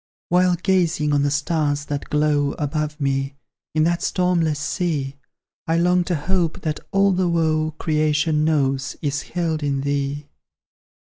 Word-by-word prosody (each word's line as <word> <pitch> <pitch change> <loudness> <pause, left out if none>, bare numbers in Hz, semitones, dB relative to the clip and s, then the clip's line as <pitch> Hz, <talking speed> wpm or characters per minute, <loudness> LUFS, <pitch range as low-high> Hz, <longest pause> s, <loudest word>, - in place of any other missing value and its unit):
While 180 0 +4
gazing 170 -5 +1
on 145 - +3
the 145 - +2
stars 145 -1 0
that 145 -1 -4
glow 150 -1 +1
Above 150 0 -3
me, 135 0 -1 0.4
in 155 - +3
that 170 +1 +1
stormless 175 -4 +1
sea, 155 -5 -2 0.5
I 165 +1 +2
long 180 +1 +3
to 180 - 0
hope 170 +2 -1
that 155 -3 -2
all 195 0 +4
the 185 -1 +1
woe 155 -2 +1
Creation 155 0 +1
knows, 135 -4 0
is 145 -1 -1
held 165 -3 -2
in 140 -2 -1
thee! 140 +1 -2
155 Hz, 145 wpm, -22 LUFS, 145-170 Hz, 0.5 s, While